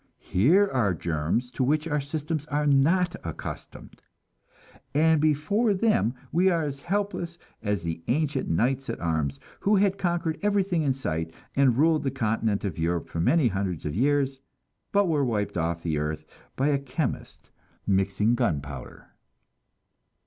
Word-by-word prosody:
Here 170 Hz, -, +3 dB
are 115 Hz, -, +1 dB
germs 85 Hz, +10 st, -1 dB
to 130 Hz, -, -1 dB
which 150 Hz, +4 st, +1 dB
our 150 Hz, -2 st, 0 dB
systems 150 Hz, +1 st, -3 dB
are 150 Hz, 0 st, 0 dB
not 170 Hz, +6 st, +3 dB
accustomed; 80 Hz, -, -8 dB, 0.9 s
and 160 Hz, 0 st, +4 dB
before 195 Hz, +9 st, +2 dB
them 190 Hz, -, +2 dB, 0.2 s
we 180 Hz, +4 st, +4 dB
are 170 Hz, -3 st, +1 dB
as 140 Hz, -2 st, -4 dB
helpless 195 Hz, -2 st, -2 dB, 0.2 s
as 105 Hz, -5 st, -1 dB
the 80 Hz, -1 st, -3 dB
ancient 145 Hz, 0 st, 0 dB
knights 130 Hz, +9 st, 0 dB
at -, -, -3 dB
arms, 75 Hz, -5 st, -1 dB, 0.2 s
who 210 Hz, +2 st, +3 dB
had 195 Hz, 0 st, +2 dB
conquered 170 Hz, -3 st, -1 dB
everything 195 Hz, -4 st, +1 dB
in 140 Hz, -3 st, +2 dB
sight, 80 Hz, -11 st, -3 dB, 0.2 s
and 135 Hz, -4 st, +4 dB
ruled 155 Hz, +2 st, +4 dB
the 135 Hz, -, 0 dB
continent 110 Hz, -5 st, -1 dB
of 85 Hz, -5 st, -4 dB
Europe 85 Hz, +1 st, -1 dB
for 85 Hz, -, -4 dB
many 145 Hz, -, +3 dB
hundreds 95 Hz, -5 st, -3 dB
of 75 Hz, -, -2 dB
years, 135 Hz, -, +1 dB, 0.5 s
but 200 Hz, -1 st, +3 dB
were 150 Hz, -4 st, +2 dB
wiped 110 Hz, -5 st, -1 dB
off 85 Hz, 0 st, -1 dB
the 80 Hz, -3 st, 0 dB
earth 75 Hz, +1 st, -3 dB, 0.3 s
by 135 Hz, +3 st, +1 dB
a 140 Hz, -1 st, +2 dB
chemist 140 Hz, 0 st, -4 dB, 0.3 s
mixing 100 Hz, +3 st, +2 dB
gunpowder. 70 Hz, -, -3 dB
135 Hz, 150 wpm, -26 LUFS, 95-160 Hz, 0.9 s, and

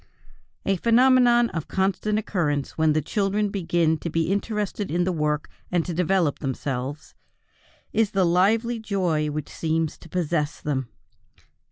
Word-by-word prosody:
A 195 Hz, -1 st, +1 dB
phenomenon 240 Hz, +2 st, +4 dB
of 165 Hz, -3 st, -4 dB
constant 195 Hz, +2 st, 0 dB
occurrence 160 Hz, -10 st, -1 dB
when 160 Hz, -1 st, +3 dB
the 155 Hz, -1 st, 0 dB
children 205 Hz, +4 st, 0 dB
begin 170 Hz, -4 st, +1 dB
to 170 Hz, -, -4 dB
be 165 Hz, +2 st, 0 dB
interested 205 Hz, 0 st, -2 dB
in 175 Hz, +3 st, +1 dB
the 185 Hz, -, 0 dB
work 150 Hz, -2 st, -1 dB, 0.2 s
and 175 Hz, -2 st, +1 dB
to 175 Hz, -, -3 dB
develop 175 Hz, -2 st, +1 dB
themselves 135 Hz, +1 st, -4 dB, 0.8 s
is 225 Hz, -2 st, +2 dB
the 190 Hz, -2 st, +2 dB
lively 220 Hz, +7 st, +2 dB
joy 180 Hz, -8 st, 0 dB
which 150 Hz, 0 st, -4 dB
seems 160 Hz, -1 st, -2 dB
to 165 Hz, -, -14 dB
possess 150 Hz, -3 st, -1 dB
them. 135 Hz, -5 st, -2 dB
175 Hz, 145 wpm, -24 LUFS, 155-205 Hz, 0.8 s, phenomenon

